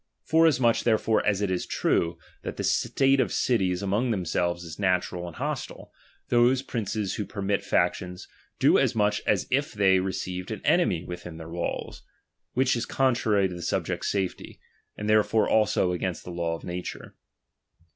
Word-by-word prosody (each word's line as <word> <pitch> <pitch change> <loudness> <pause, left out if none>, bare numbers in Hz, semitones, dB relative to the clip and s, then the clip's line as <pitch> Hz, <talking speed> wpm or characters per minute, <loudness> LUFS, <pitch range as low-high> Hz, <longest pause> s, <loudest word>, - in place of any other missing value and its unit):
Forasmuch 145 -8 +4
therefore 110 -1 +2
as 105 -1 +2
it 100 -2 0
is 90 - -2
true, 85 0 0 0.2
that - - -6
the - - -3
state 135 0 +2
of 130 - +1
cities 95 -7 +1
among 105 +6 0
themselves 85 -3 -1
is 80 0 -9
natural 90 -2 0
and 85 - -9
hostile, - - -5 0.4
those 125 +2 +4
princes 110 -5 -3
who 110 - -2
permit 100 0 -2
factions, 90 -1 -1 0.3
do - - +5
as - - +1
much 105 -1 +1
as 100 -4 +2
if 140 +2 +1
they 95 -2 +4
received 90 -1 -4
an - - -6
enemy 85 -1 +2
within 90 -2 -8
tlieir 80 0 -9
walls: 85 0 -4 0.5
which 130 0 +2
is 120 - -3
contrary 115 -7 +2
to 90 - -7
the 85 - -7
subjects' - - -2
safety, 95 -3 -3 0.4
and 105 - -4
therefore 110 +1 +3
also 105 -4 +2
against 90 0 -3
the 90 - -8
law 85 -1 -2
of - - -11
nature. 90 0 -6
100 Hz, 165 wpm, -26 LUFS, 90-115 Hz, 0.5 s, do